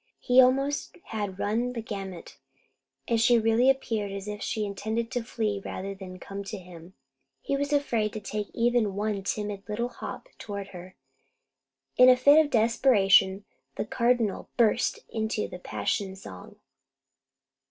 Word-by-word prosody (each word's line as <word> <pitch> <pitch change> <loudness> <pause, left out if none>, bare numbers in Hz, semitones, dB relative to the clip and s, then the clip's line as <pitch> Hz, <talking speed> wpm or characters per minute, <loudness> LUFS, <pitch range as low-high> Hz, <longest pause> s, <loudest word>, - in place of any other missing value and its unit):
He 250 0 +5
almost 275 +3 +1
had 205 -4 -4
run 230 +5 -1
the 235 - -4
gamut, 195 -5 -7 0.7
and 230 -1 +2
she 240 +1 +5
really 225 +3 +3
appeared 225 -6 0
as 195 0 -6
if 210 0 -5
she 215 -2 -2
intended 220 +4 -3
to 245 -2 -1
flee 215 -4 -2
rather 195 +1 -5
than 190 -1 -9
to - - -10
come 200 +1 -7
to 210 - -5
him. 180 -1 -13 0.4
He 275 - -2
was 285 +1 -2
afraid 235 -7 +1
to 215 - -4
take 210 0 -4
even 235 -4 +1
one 205 -1 -1
timid 205 0 -3
little 235 +3 -2
hop - - -8
toward 200 -2 -6
her. 185 0 -11 1.0
In 250 0 +8
a 250 - +7
fit 285 +5 +6
of 295 - -5
desperation 215 -5 +4 0.3
the - - -2
Cardinal 235 -4 0
burst 235 0 +2
into 220 -1 -2
the 180 - -9
passion 185 - -2
song. 95 - -11
215 Hz, 155 wpm, -27 LUFS, 195-240 Hz, 1.0 s, In